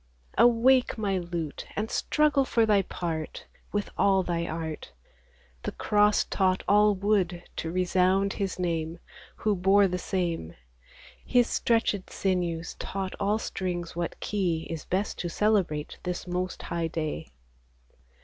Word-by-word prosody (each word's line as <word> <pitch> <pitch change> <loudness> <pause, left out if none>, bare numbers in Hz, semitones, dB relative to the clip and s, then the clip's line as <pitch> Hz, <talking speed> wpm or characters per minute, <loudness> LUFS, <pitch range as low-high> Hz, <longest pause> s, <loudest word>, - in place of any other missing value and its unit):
Awake, 245 +2 +5
my 200 -3 0
lute, 170 -4 -5
and 215 +2 -2
struggle 300 -2 +2
for 230 -3 +2
thy 210 -2 +4
part, 165 -4 -4 0.3
With 205 0 -2
all 195 -1 +4
thy 170 -1 -1
art; 160 -1 -5 0.7
The - - -4
cross 210 0 +3
taught 185 -1 +1
all 210 0 +5
wood 190 -3 +1
to 160 - -2
resound 185 +2 +2
His 195 -2 -3
name, 165 -2 -2 0.4
Who 210 -1 0
bore 195 +2 +4
the 180 0 -2
same: 170 - -2 0.7
His 245 -1 +3
stretched 225 -4 +1
sinews 175 -4 -1
taught 190 -1 -4
all 205 +1 +2
strings 175 -6 -4
what 170 0 -3
key 175 -6 -1
Is 165 -3 -5
best 195 +3 -1
to 175 - -2
celebrate 185 -7 0
this 180 -1 -4
most 180 +1 -3
high 170 -1 -2
day. 155 - -3
185 Hz, 135 wpm, -28 LUFS, 170-205 Hz, 0.7 s, Awake